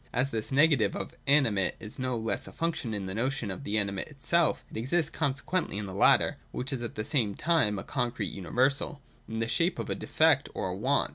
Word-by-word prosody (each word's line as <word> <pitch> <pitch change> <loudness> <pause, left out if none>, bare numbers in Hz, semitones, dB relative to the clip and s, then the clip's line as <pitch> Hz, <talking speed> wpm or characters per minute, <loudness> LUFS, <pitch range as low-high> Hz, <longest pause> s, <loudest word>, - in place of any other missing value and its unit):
As 130 +3 0
this 110 +2 -3
negative 145 -3 +4
of 95 - -4
the - - -24
animate 115 -10 +3
is 110 +2 -8
no 130 -1 -1
less 110 0 -1
a - - -9
function 165 -8 -2
in 100 -3 -3
the 95 - -4
notion 120 -1 -1
of 95 - -7
the 105 +1 -1
animate 100 -2 -1
itself, 155 +3 +1
it - - -10
exists 150 +8 0
consequently 140 - -1
in 105 - -2
the 95 - -7
latter 100 - +4
(which 135 +3 -3
is 130 - -3
at 120 - -5
the 110 - -3
same 115 -9 +1
time 155 -11 +2
a - - -4
concrete 120 -6 -2
universal) 130 +9 0 0.3
in 110 - -4
the 115 0 0
shape 165 +11 +1
of - - -4
a - - +2
defect - - +3
or - - -2
want. - - +1
120 Hz, 220 wpm, -29 LUFS, 105-140 Hz, 0.3 s, negative